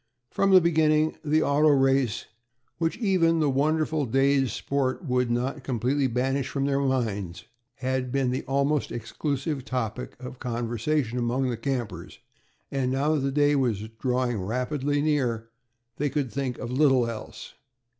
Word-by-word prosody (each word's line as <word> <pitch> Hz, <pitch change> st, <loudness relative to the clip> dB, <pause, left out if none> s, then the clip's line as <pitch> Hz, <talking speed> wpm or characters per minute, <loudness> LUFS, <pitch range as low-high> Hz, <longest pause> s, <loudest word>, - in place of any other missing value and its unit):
From 195 Hz, -, +2 dB
the 190 Hz, -1 st, +8 dB
beginning, 155 Hz, -2 st, +3 dB
the 155 Hz, +1 st, +2 dB
auto 145 Hz, +2 st, +3 dB
race, 135 Hz, -5 st, +2 dB, 0.5 s
which 165 Hz, -1 st, 0 dB
even 180 Hz, -7 st, +2 dB
the 150 Hz, -3 st, +2 dB
wonderful 155 Hz, +1 st, +1 dB
day's 135 Hz, 0 st, +2 dB
sport 140 Hz, -, -2 dB
could 125 Hz, -1 st, +1 dB
not 125 Hz, +4 st, -1 dB
completely 130 Hz, +3 st, 0 dB
banish 130 Hz, +2 st, -1 dB
from 140 Hz, -1 st, -1 dB
their 140 Hz, 0 st, +1 dB
minds, 110 Hz, -10 st, -2 dB, 0.3 s
had 130 Hz, -1 st, -2 dB
been 135 Hz, -1 st, +1 dB
the 130 Hz, -, -1 dB
almost 140 Hz, +2 st, 0 dB
exclusive 140 Hz, +4 st, -3 dB
topic 125 Hz, -2 st, -4 dB
of 125 Hz, 0 st, -9 dB
conversation 120 Hz, +2 st, -1 dB
among 125 Hz, +2 st, 0 dB
the -, -, -2 dB
campers, 115 Hz, -8 st, -4 dB, 0.5 s
and 130 Hz, -2 st, 0 dB
now 140 Hz, +4 st, +1 dB
that 155 Hz, -, +1 dB
the 135 Hz, 0 st, 0 dB
day 145 Hz, +1 st, +3 dB
was 115 Hz, -6 st, 0 dB, 0.2 s
rapidly 125 Hz, +3 st, -1 dB
drawing 145 Hz, +1 st, +1 dB
near, 120 Hz, -7 st, 0 dB, 0.5 s
they 145 Hz, 0 st, 0 dB
could 135 Hz, -3 st, -2 dB
think 135 Hz, -3 st, -3 dB
of 120 Hz, -, -5 dB
little 130 Hz, -3 st, +3 dB
else. 115 Hz, -2 st, -7 dB
135 Hz, 150 wpm, -26 LUFS, 125-145 Hz, 0.5 s, the